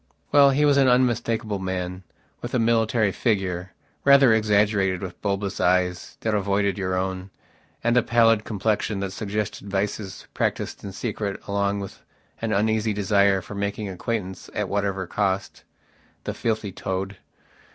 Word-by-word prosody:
Well, 140 Hz, -1 st, +7 dB
he 145 Hz, +2 st, +3 dB
was 145 Hz, -1 st, +4 dB
an 135 Hz, -1 st, +5 dB
unmistakable 120 Hz, -4 st, +1 dB
man, 90 Hz, -1 st, -3 dB, 0.4 s
with 120 Hz, +1 st, -4 dB
a -, -, +4 dB
military 115 Hz, -2 st, +2 dB
figure, 95 Hz, -4 st, -1 dB, 0.3 s
rather 140 Hz, -4 st, +7 dB
exaggerated, 105 Hz, -3 st, +2 dB
with 90 Hz, -2 st, -7 dB
bulbous 100 Hz, -1 st, -2 dB
eyes 90 Hz, 0 st, +1 dB
that 110 Hz, -, 0 dB
avoided 100 Hz, -1 st, +1 dB
your 95 Hz, -1 st, -2 dB
own, 95 Hz, 0 st, -3 dB, 0.5 s
and 120 Hz, +1 st, +2 dB
a 125 Hz, -, +6 dB
pallid 115 Hz, -3 st, +3 dB
complexion 105 Hz, -1 st, -1 dB
that 100 Hz, -1 st, -3 dB
suggested 100 Hz, 0 st, -4 dB
vices 100 Hz, 0 st, -3 dB
practised -, -, -2 dB
in 100 Hz, -, -6 dB
secret 100 Hz, 0 st, -3 dB
along 100 Hz, 0 st, 0 dB
with 100 Hz, -, -9 dB, 0.4 s
an 115 Hz, -1 st, -1 dB
uneasy 110 Hz, +1 st, +1 dB
desire 100 Hz, -1 st, +2 dB
for -, -, -9 dB
making 100 Hz, +1 st, -3 dB
acquaintance 95 Hz, 0 st, -4 dB
at -, -, -1 dB
whatever 100 Hz, -2 st, -1 dB
cost.... 95 Hz, +1 st, -2 dB, 0.6 s
The -, -, -3 dB
filthy 110 Hz, -3 st, -2 dB
toad... 95 Hz, +1 st, -4 dB
100 Hz, 145 wpm, -24 LUFS, 95-110 Hz, 0.6 s, Well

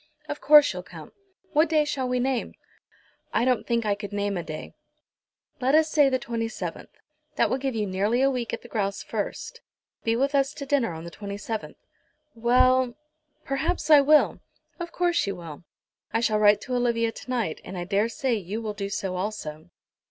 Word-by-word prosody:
Of 295 Hz, -, -5 dB
course 295 Hz, -1 st, +7 dB
you'll -, -, -5 dB
come. -, -, -12 dB, 0.4 s
What 310 Hz, +1 st, +4 dB
day 310 Hz, -2 st, +3 dB
shall 265 Hz, -4 st, -2 dB
we 250 Hz, 0 st, +1 dB
name?" 255 Hz, -1 st, -1 dB, 0.8 s
"I 235 Hz, -, +3 dB
don't 250 Hz, -3 st, +1 dB
think 235 Hz, -1 st, 0 dB
I 205 Hz, -, +2 dB
could 205 Hz, 0 st, -6 dB
name 205 Hz, 0 st, -1 dB
a 175 Hz, -, -2 dB
day." 155 Hz, -2 st, -7 dB, 0.9 s
"Let 265 Hz, +2 st, +3 dB
us 310 Hz, 0 st, +4 dB
say 290 Hz, -3 st, +5 dB
the 260 Hz, -, +1 dB
27th. 230 Hz, -2 st, -4 dB, 0.5 s
That -, -, +2 dB
will 260 Hz, -, 0 dB
give 265 Hz, -2 st, -2 dB
you 215 Hz, -1 st, 0 dB
nearly 205 Hz, +6 st, +1 dB
a 275 Hz, -, +4 dB
week 240 Hz, -4 st, -3 dB
at -, -, -5 dB
the -, -, -11 dB
grouse 200 Hz, -3 st, -2 dB
first. 485 Hz, -, -5 dB, 0.4 s
Be 225 Hz, 0 st, +1 dB
with 275 Hz, +4 st, +1 dB
us 275 Hz, +1 st, +1 dB
to 280 Hz, -, -6 dB
dinner 270 Hz, -10 st, +1 dB
on 160 Hz, 0 st, -7 dB
the 170 Hz, -, -8 dB
27th." 205 Hz, +3 st, -5 dB, 0.6 s
"Well, 250 Hz, +1 st, +3 dB, 0.5 s
perhaps 295 Hz, +4 st, -1 dB
I 295 Hz, -2 st, +9 dB
will." 300 Hz, +2 st, +4 dB, 0.4 s
"Of 345 Hz, 0 st, -5 dB
course 350 Hz, -, +1 dB
you 200 Hz, -, -2 dB
will. 170 Hz, -1 st, -10 dB, 0.5 s
I 225 Hz, -, +1 dB
shall 220 Hz, -2 st, +1 dB
write 205 Hz, -1 st, +5 dB
to 255 Hz, -, -5 dB
Olivia 235 Hz, -2 st, +1 dB
to 255 Hz, -, -12 dB
night, 230 Hz, -10 st, -1 dB
and 190 Hz, -, -7 dB
I 175 Hz, -, -3 dB
daresay 225 Hz, -, 0 dB
you 205 Hz, 0 st, -3 dB
will 220 Hz, -2 st, -4 dB
do 200 Hz, -1 st, -4 dB
so 195 Hz, -2 st, -3 dB
also." 180 Hz, -5 st, -5 dB
235 Hz, 190 wpm, -26 LUFS, 205-270 Hz, 0.9 s, I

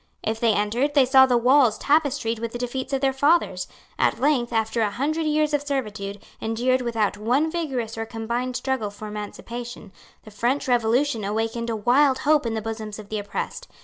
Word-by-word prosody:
If 220 Hz, +1 st, -2 dB
they 230 Hz, -2 st, +3 dB
entered, 235 Hz, +8 st, 0 dB
they 275 Hz, -2 st, +6 dB
saw 265 Hz, +1 st, +6 dB
the 245 Hz, -2 st, +3 dB
walls 245 Hz, -2 st, +4 dB
tapestried 280 Hz, -6 st, +1 dB
with 230 Hz, 0 st, -4 dB
the -, -, -3 dB
defeats 250 Hz, +2 st, -4 dB
of 270 Hz, -1 st, 0 dB
their 270 Hz, -1 st, +2 dB
fathers. 270 Hz, -, +2 dB, 0.3 s
At -, -, +2 dB
length, 265 Hz, -4 st, +1 dB
after 225 Hz, 0 st, 0 dB
a 215 Hz, -, +2 dB
hundred 305 Hz, +9 st, -1 dB
years 305 Hz, 0 st, +1 dB
of 290 Hz, -, +2 dB
servitude, 215 Hz, -8 st, -4 dB, 0.2 s
endured 245 Hz, +3 st, 0 dB
without 225 Hz, -4 st, -1 dB
one 255 Hz, +9 st, +1 dB
vigorous 255 Hz, -10 st, -3 dB
or 225 Hz, -, -3 dB
combined 235 Hz, +3 st, -3 dB
struggle 260 Hz, -6 st, -1 dB
for 205 Hz, +1 st, -9 dB
emancipation, 215 Hz, +1 st, -7 dB, 0.3 s
the 215 Hz, -, -13 dB
French 240 Hz, +7 st, -1 dB
revolution 240 Hz, 0 st, +1 dB
awakened 225 Hz, +3 st, -2 dB
a 225 Hz, -, -1 dB
wild 260 Hz, +5 st, +3 dB
hope 295 Hz, -3 st, +2 dB
in 225 Hz, -, -2 dB
the 220 Hz, -, -3 dB
bosoms 220 Hz, -1 st, -5 dB
of 210 Hz, -2 st, -11 dB
the 215 Hz, -, -2 dB
oppressed. 205 Hz, 0 st, -5 dB
240 Hz, 190 wpm, -24 LUFS, 220-270 Hz, 0.3 s, they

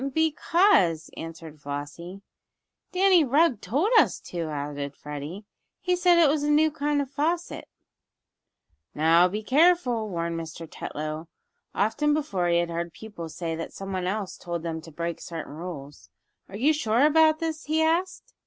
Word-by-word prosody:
"Because," 320 Hz, -, +3 dB
answered 165 Hz, -2 st, -9 dB
Flossie. 145 Hz, +7 st, -7 dB, 0.7 s
"Danny 370 Hz, -2 st, +5 dB
Rugg 280 Hz, -3 st, +2 dB
told 315 Hz, -, 0 dB
us -, -, +2 dB
to," 170 Hz, -3 st, -5 dB
added 145 Hz, -1 st, -4 dB
Freddie. 150 Hz, +7 st, -7 dB, 0.3 s
"He 360 Hz, 0 st, +1 dB
said 355 Hz, -1 st, +4 dB
it 335 Hz, -2 st, +6 dB
was 290 Hz, +1 st, +1 dB
a 295 Hz, -, 0 dB
new 305 Hz, +1 st, +4 dB
kind 290 Hz, -1 st, 0 dB
of 270 Hz, -, -12 dB
faucet." 330 Hz, +4 st, -2 dB, 1.3 s
"Now 165 Hz, +3 st, +5 dB
be 210 Hz, +4 st, -4 dB
careful," 260 Hz, -5 st, +3 dB
warned 170 Hz, -2 st, -3 dB
Mr. 165 Hz, 0 st, -8 dB
Tetlow. 155 Hz, +1 st, -6 dB, 0.5 s
Often 295 Hz, +8 st, +1 dB
before 200 Hz, -13 st, -1 dB
he 170 Hz, 0 st, +3 dB
had 170 Hz, 0 st, 0 dB
heard 170 Hz, 0 st, -4 dB
pupils 170 Hz, -8 st, -9 dB
say 165 Hz, -2 st, -3 dB
that 165 Hz, -, -6 dB
someone 190 Hz, -2 st, -4 dB
else 200 Hz, 0 st, -3 dB
told 170 Hz, -1 st, -5 dB
them 165 Hz, -1 st, -4 dB
to 165 Hz, -, -12 dB
break 170 Hz, +2 st, -4 dB
certain 165 Hz, -3 st, -7 dB
rules. 145 Hz, -, -8 dB, 0.4 s
"Are 195 Hz, -, -7 dB
you 285 Hz, +8 st, +3 dB
sure 245 Hz, -3 st, +2 dB
about 310 Hz, 0 st, +5 dB
this?" 320 Hz, -1 st, -4 dB
he 315 Hz, +1 st, +1 dB
asked. 365 Hz, +9 st, -1 dB
195 Hz, 155 wpm, -26 LUFS, -, 1.3 s, it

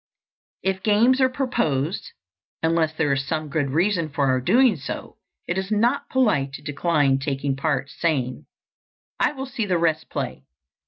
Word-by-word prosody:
If 190 Hz, 0 st, 0 dB
games 230 Hz, +6 st, +4 dB
are 260 Hz, -, +5 dB
proposed, 180 Hz, -, -1 dB, 0.5 s
unless 160 Hz, -1 st, +2 dB
there 155 Hz, -3 st, 0 dB
is 135 Hz, 0 st, 0 dB
some 155 Hz, -1 st, -2 dB
good 145 Hz, -2 st, 0 dB
reason 170 Hz, +2 st, +1 dB
for 145 Hz, -1 st, 0 dB
our 130 Hz, 0 st, +2 dB
doing 235 Hz, -, +4 dB
so, 140 Hz, -3 st, -7 dB, 0.3 s
it 175 Hz, +2 st, 0 dB
is 190 Hz, 0 st, -4 dB
not 235 Hz, +6 st, +1 dB
polite 175 Hz, -, +2 dB
to -, -, -8 dB
decline 145 Hz, -2 st, +1 dB
taking 135 Hz, 0 st, -2 dB
part, 135 Hz, -1 st, -1 dB
saying, 135 Hz, -7 st, -1 dB, 0.7 s
"I -, -, +2 dB
will 270 Hz, -2 st, -5 dB
see 245 Hz, -5 st, -3 dB
the 180 Hz, -2 st, +2 dB
rest 160 Hz, -2 st, 0 dB
play." -, -, -4 dB
160 Hz, 160 wpm, -23 LUFS, 140-210 Hz, 0.7 s, are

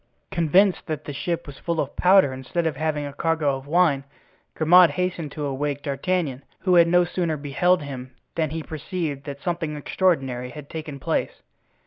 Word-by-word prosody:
Convinced 185 Hz, +2 st, +3 dB
that 155 Hz, -2 st, -4 dB
the 145 Hz, -, -5 dB
ship 170 Hz, +4 st, -3 dB
was 145 Hz, -2 st, -10 dB
full 170 Hz, -1 st, -2 dB
of 140 Hz, -, -2 dB
powder 185 Hz, -7 st, +5 dB
instead 130 Hz, +6 st, -3 dB
of 160 Hz, -3 st, 0 dB
having 150 Hz, 0 st, -1 dB
a 140 Hz, -, -6 dB
cargo 155 Hz, -2 st, +1 dB
of 135 Hz, +1 st, -9 dB
wine, 155 Hz, -4 st, +3 dB, 0.5 s
Grimaud 175 Hz, +2 st, +7 dB
hastened 180 Hz, -4 st, -2 dB
to 150 Hz, -2 st, -4 dB
awake 145 Hz, +1 st, -2 dB
D'Artagnan, 140 Hz, -1 st, -1 dB, 0.2 s
who 185 Hz, -, +2 dB
had 170 Hz, -1 st, +7 dB
no 175 Hz, +1 st, +4 dB
sooner 170 Hz, -3 st, -1 dB
beheld 150 Hz, +5 st, +1 dB
him 130 Hz, -2 st, -8 dB, 0.2 s
than 160 Hz, -2 st, 0 dB
he 160 Hz, +1 st, -4 dB
perceived 155 Hz, -2 st, -4 dB
that 140 Hz, -1 st, -7 dB
something 170 Hz, -3 st, -2 dB
extraordinary 135 Hz, -6 st, 0 dB
had 145 Hz, +1 st, -10 dB
taken 155 Hz, -3 st, -6 dB
place. -, -, -2 dB
155 Hz, 175 wpm, -24 LUFS, 140-175 Hz, 0.5 s, Grimaud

